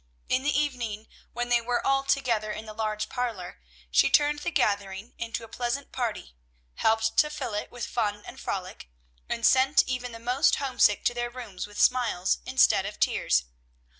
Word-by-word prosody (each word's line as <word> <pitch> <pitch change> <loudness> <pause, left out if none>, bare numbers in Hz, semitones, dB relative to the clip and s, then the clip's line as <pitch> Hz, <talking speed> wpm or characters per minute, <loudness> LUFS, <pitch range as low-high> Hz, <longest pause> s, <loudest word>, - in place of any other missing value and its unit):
In 255 - +2
the 290 +1 +1
evening, 235 -7 -3 0.2
when 240 +1 -3
they 240 -1 +4
were 240 +1 -1
all 270 0 +2
together 235 -6 0
in 215 +1 -6
the 215 - -8
large 215 -1 -2
parlor, 225 - -4 0.3
she 60 - +5
turned 295 0 +3
the 320 - -2
gathering 200 - -1
into 230 0 -4
a - - -9
pleasant 245 +4 -3
party, 225 - -3 0.4
helped 225 0 +1
to 300 - +5
fill 300 -7 -5
it 210 - -3
with 245 -1 -5
fun 210 -3 -2
and - - -10
frolic, 185 - -5 0.4
and 230 -1 -1
sent 265 +2 +5
even 250 -1 -3
the 230 - -8
most 250 +5 +2
homesick 255 -6 +2
to 240 - +3
their 240 0 -2
rooms 235 -7 -7
with 205 0 -10
smiles 230 -8 +2
instead 255 -6 +4
of 205 - -8
tears. - - +2
235 Hz, 180 wpm, -27 LUFS, 210-255 Hz, 0.4 s, she